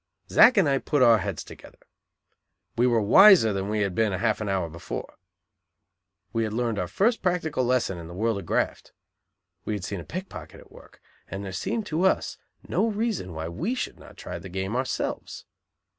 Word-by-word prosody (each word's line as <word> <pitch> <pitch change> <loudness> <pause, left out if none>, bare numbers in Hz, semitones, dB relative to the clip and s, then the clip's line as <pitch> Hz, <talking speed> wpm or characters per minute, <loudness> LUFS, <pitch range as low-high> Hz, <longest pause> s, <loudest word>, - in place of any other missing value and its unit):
Zack 250 - +6
and 190 -6 +5
I 135 -1 +2
put 145 -1 +1
our 115 -3 +6
heads 90 - -4
together. - - -14 1.0
We 120 +2 +3
were 115 -3 +2
"wiser" 185 - +7
than 95 +1 -3
we 105 0 0
had 100 -2 0
been 110 +1 +1
half 110 +3 0
an 105 - -3
hour 95 -3 0
before. 80 +1 -7 1.2
We 115 - 0
had 110 -1 -3
learned 115 -2 -1
our 90 - -2
first 225 - +1
practical 165 -7 0
lesson 120 -7 0
in 85 - -9
the 85 - -10
world 110 +1 0
of 90 - -10
graft. - - -2 0.7
We 110 - -3
had 100 -3 -4
seen 100 0 -4
a - - -7
pickpocket 185 - -8
at - - -18
work, - - -17 0.3
and 100 +2 -6
there 95 - -5
seemed 205 - -3
to 160 -3 -2
us 190 - 0 0.3
no 225 - +1
reason 215 - -2
why 80 +1 -4
we 180 - -2
should - - -5
not - - -15
try - - -7
the 95 - -10
game 95 +4 -3
ourselves. 130 +1 -3
110 Hz, 195 wpm, -26 LUFS, 95-160 Hz, 1.2 s, wiser